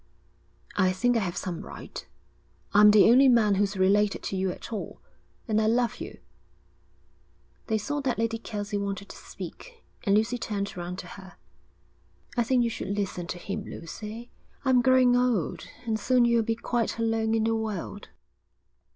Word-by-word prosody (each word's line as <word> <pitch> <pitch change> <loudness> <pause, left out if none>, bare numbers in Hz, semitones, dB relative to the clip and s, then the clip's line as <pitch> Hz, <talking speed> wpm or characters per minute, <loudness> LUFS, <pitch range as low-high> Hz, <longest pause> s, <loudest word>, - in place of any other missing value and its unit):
'I 185 -2 +3
think 245 +6 +1
I - - +3
have 180 -5 -3
some 175 -3 -4
right. - - -9 0.7
I'm 210 +1 +8
the 210 -1 +7
only 265 +2 +7
man 225 -4 +4
who's 200 0 0
related 200 +2 +2
to - - -3
you 190 0 0
at 205 - -7
all, 215 - -5 0.5
and 220 -1 +2
I 215 - +2
love 235 0 +1
you.' - - -8 1.5
They 220 - +1
saw 290 +7 -2
that 265 -3 -1
Lady 230 0 -1
Kelsey 205 -2 -4
wanted 200 -1 -4
to - - -9
speak, 480 -2 -10 0.2
and 200 -1 +3
Lucy 230 +3 0
turned 200 -3 -3
round 175 0 -5
to 180 - -7
her. 190 -1 -14 1.0
'I 240 - +2
think 250 0 +3
you 235 - +1
should 200 -2 -4
listen 180 -3 -3
to 175 - -4
him, 195 +3 -5
Lucy. 215 +8 -8 0.3
I'm 255 -2 +5
growing 255 -1 +5
old, 245 -9 0 0.2
and 220 -2 -1
soon 245 +3 +3
you'll 235 -1 +3
be 225 0 -1
quite 230 0 -1
alone 225 -1 +1
in 220 - +1
the 225 0 +1
world.' 210 -2 -4
220 Hz, 170 wpm, -27 LUFS, 200-235 Hz, 1.5 s, I'm